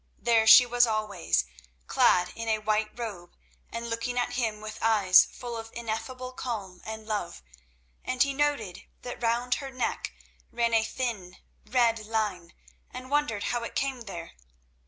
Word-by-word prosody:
There 225 Hz, -2 st, +3 dB
she 250 Hz, +3 st, +10 dB
was 245 Hz, 0 st, +3 dB
always, 215 Hz, -, 0 dB, 0.4 s
clad 180 Hz, -, +3 dB
in 230 Hz, 0 st, -4 dB
a 220 Hz, -, +3 dB
white 215 Hz, 0 st, 0 dB
robe, 200 Hz, -8 st, -7 dB, 0.4 s
and 230 Hz, 0 st, -5 dB
looking 230 Hz, +2 st, -3 dB
at 245 Hz, 0 st, 0 dB
him 225 Hz, -4 st, -1 dB
with 215 Hz, 0 st, -8 dB
eyes 205 Hz, -5 st, +6 dB
full 240 Hz, -1 st, -8 dB
of 225 Hz, 0 st, -6 dB
ineffable 235 Hz, +3 st, -5 dB
calm 210 Hz, -8 st, -5 dB
and 220 Hz, 0 st, -6 dB
love, 205 Hz, -, -4 dB, 0.6 s
and 255 Hz, -1 st, +2 dB
he 280 Hz, 0 st, -1 dB
noted 275 Hz, -10 st, -1 dB, 0.2 s
that 245 Hz, -1 st, -7 dB
round 240 Hz, +2 st, +1 dB
her 275 Hz, -, -6 dB
neck 255 Hz, -2 st, -3 dB, 0.4 s
ran 235 Hz, -1 st, 0 dB
a 225 Hz, -1 st, +4 dB
thin, 220 Hz, -7 st, -4 dB, 0.3 s
red 230 Hz, -2 st, +2 dB
line, 205 Hz, -6 st, -2 dB, 0.3 s
and 255 Hz, +1 st, -9 dB
wondered 285 Hz, -9 st, +1 dB
how 240 Hz, -, 0 dB
it -, -, -7 dB
came 270 Hz, -2 st, -1 dB
there. 195 Hz, -6 st, -8 dB
230 Hz, 155 wpm, -28 LUFS, 215-245 Hz, 0.6 s, she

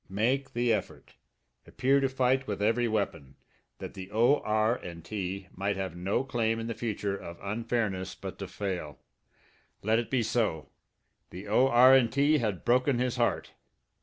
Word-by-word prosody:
Make 125 Hz, +8 st, 0 dB
the 120 Hz, -1 st, +2 dB
effort, 105 Hz, -, -5 dB, 0.5 s
appear 135 Hz, +2 st, +2 dB
to 135 Hz, -1 st, +1 dB
fight 130 Hz, 0 st, +1 dB
with 100 Hz, -2 st, -3 dB
every 115 Hz, +4 st, +2 dB
weapon, 80 Hz, -, -3 dB, 0.4 s
that -, -, -8 dB
the 95 Hz, -1 st, -8 dB
O.R. 110 Hz, -2 st, +2 dB
& 85 Hz, -1 st, -12 dB
T. 95 Hz, -1 st, -4 dB
might 100 Hz, +2 st, -1 dB
have 95 Hz, -3 st, -4 dB
no 95 Hz, +8 st, -1 dB
claim 115 Hz, -4 st, -1 dB
in 115 Hz, -, -4 dB
the 115 Hz, -, -3 dB
future 105 Hz, -4 st, -3 dB
of 85 Hz, -3 st, -9 dB
unfairness 105 Hz, -3 st, -2 dB
but -, -, -8 dB
to -, -, -5 dB
fail! 90 Hz, -8 st, -4 dB, 0.9 s
Let 110 Hz, +2 st, +3 dB
it 120 Hz, -, -4 dB
be 130 Hz, -3 st, +1 dB
so! 110 Hz, -8 st, -1 dB, 0.6 s
The 95 Hz, +4 st, -9 dB
O.R. 130 Hz, +3 st, +6 dB
& 120 Hz, -, +1 dB
T. 145 Hz, +5 st, +2 dB
had 105 Hz, -7 st, -2 dB
broken 125 Hz, +2 st, +3 dB
his 125 Hz, 0 st, -1 dB
heart. 120 Hz, -1 st, 0 dB
110 Hz, 165 wpm, -29 LUFS, 100-125 Hz, 0.9 s, O.R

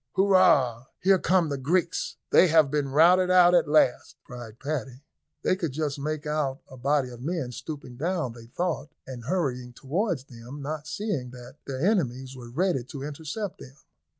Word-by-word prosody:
"Hurrah! 185 Hz, -, +4 dB, 0.2 s
here 190 Hz, 0 st, +4 dB
come 180 Hz, -3 st, +2 dB
the 140 Hz, -1 st, -3 dB
Greeks, 170 Hz, +5 st, 0 dB, 0.2 s
they 185 Hz, -, +7 dB
have 160 Hz, -4 st, +4 dB
been 145 Hz, -2 st, 0 dB
routed 175 Hz, +6 st, +5 dB
out 180 Hz, -1 st, +6 dB
at 175 Hz, -, +4 dB
last," 150 Hz, -4 st, +2 dB
cried 120 Hz, -3 st, -10 dB
Paddy. 135 Hz, -2 st, -5 dB, 0.4 s
They -, -, +2 dB
could 165 Hz, -7 st, -3 dB
just 145 Hz, -1 st, -2 dB
make 150 Hz, +1 st, -3 dB
out 150 Hz, -3 st, -1 dB
a 130 Hz, -, -12 dB
body 135 Hz, +1 st, 0 dB
of 120 Hz, -1 st, -11 dB
men 150 Hz, -3 st, -3 dB
stooping 135 Hz, -2 st, -8 dB
down, 165 Hz, -4 st, -1 dB
they 115 Hz, -1 st, -13 dB
thought, 170 Hz, +3 st, -3 dB, 0.2 s
and 125 Hz, -3 st, -8 dB
hurrying 125 Hz, -7 st, -2 dB
towards 160 Hz, -, -2 dB
them, 130 Hz, +2 st, -10 dB
not 150 Hz, +1 st, -5 dB
seeing 150 Hz, -, -3 dB
that 125 Hz, +2 st, -12 dB
their 135 Hz, +3 st, -2 dB
enemies 135 Hz, -, 0 dB
were 120 Hz, -2 st, -10 dB
ready 160 Hz, 0 st, 0 dB
to 140 Hz, 0 st, -8 dB
intercept 160 Hz, +7 st, -5 dB
them. 135 Hz, 0 st, -12 dB
145 Hz, 175 wpm, -26 LUFS, 130-175 Hz, 0.4 s, they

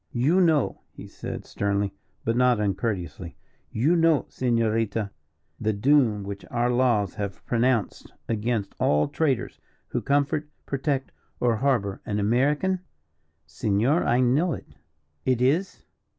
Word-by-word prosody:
"You 150 Hz, +10 st, +3 dB
know," 155 Hz, -5 st, +2 dB
he -, -, -11 dB
said, -, -, -7 dB
sternly, 100 Hz, 0 st, -1 dB, 0.3 s
but 115 Hz, -, +1 dB
not 125 Hz, -2 st, +3 dB
uncourteously, 95 Hz, -4 st, -3 dB, 0.3 s
"you 145 Hz, +10 st, +2 dB
know, 165 Hz, -3 st, +3 dB
Senorita, 115 Hz, -3 st, 0 dB, 0.5 s
the 110 Hz, 0 st, 0 dB
doom 115 Hz, -2 st, +3 dB
which 100 Hz, 0 st, -6 dB
our 120 Hz, +1 st, +1 dB
laws 120 Hz, -6 st, +2 dB
have 100 Hz, -2 st, -5 dB
pronounced 120 Hz, -2 st, 0 dB, 0.2 s
against 115 Hz, -1 st, -1 dB
all 75 Hz, +1 st, +3 dB
traitors 145 Hz, -3 st, -1 dB, 0.3 s
who -, -, -2 dB
comfort, 145 Hz, +1 st, 0 dB, 0.2 s
protect, 135 Hz, -1 st, -2 dB, 0.3 s
or 120 Hz, -2 st, +2 dB
harbour 115 Hz, -7 st, 0 dB
an 105 Hz, 0 st, -2 dB
American?" 145 Hz, -, +2 dB, 0.7 s
"Senor, 105 Hz, -, +1 dB
I 120 Hz, +2 st, +2 dB
know 145 Hz, +8 st, +2 dB
it." -, -, -7 dB, 0.6 s
"It 130 Hz, -2 st, +1 dB
is?" 150 Hz, +10 st, 0 dB
120 Hz, 125 wpm, -25 LUFS, 105-140 Hz, 0.7 s, You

